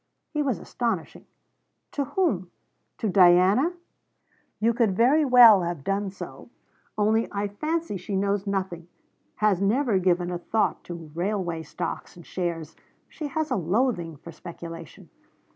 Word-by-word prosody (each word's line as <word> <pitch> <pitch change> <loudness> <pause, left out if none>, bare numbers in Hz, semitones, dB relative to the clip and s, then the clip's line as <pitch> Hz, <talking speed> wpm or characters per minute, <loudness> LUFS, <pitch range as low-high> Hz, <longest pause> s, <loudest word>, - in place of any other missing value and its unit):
He 300 - 0
was 270 -5 0
astonishing: 230 -9 -4 0.6
'To 280 - -1
whom? 270 - 0 0.5
To 220 - -2
Diana? 190 - +5 0.9
You 230 +2 +2
could 220 -5 +1
very 275 +7 +4
well 245 -7 +8
have 170 -4 -3
done 195 +3 -1
so, 190 - -10 0.5
only 220 +2 +2
I 205 0 -1
fancy 305 +4 -2
she 185 +2 -5
knows 200 +1 0
nothing, 185 -4 -3 0.5
has 210 -3 +2
never 220 0 +2
given 180 -1 +1
a 175 - -3
thought 215 +5 0
to 165 -3 -8
railway 175 -2 -2
stocks - - -6
and 170 -2 -13
shares; 165 -4 -4 0.3
she 305 - -5
has 315 +1 -2
a - - +2
loathing 180 -2 0
for 170 +3 -11
speculation.' 165 -1 -10
195 Hz, 140 wpm, -26 LUFS, 175-235 Hz, 0.9 s, well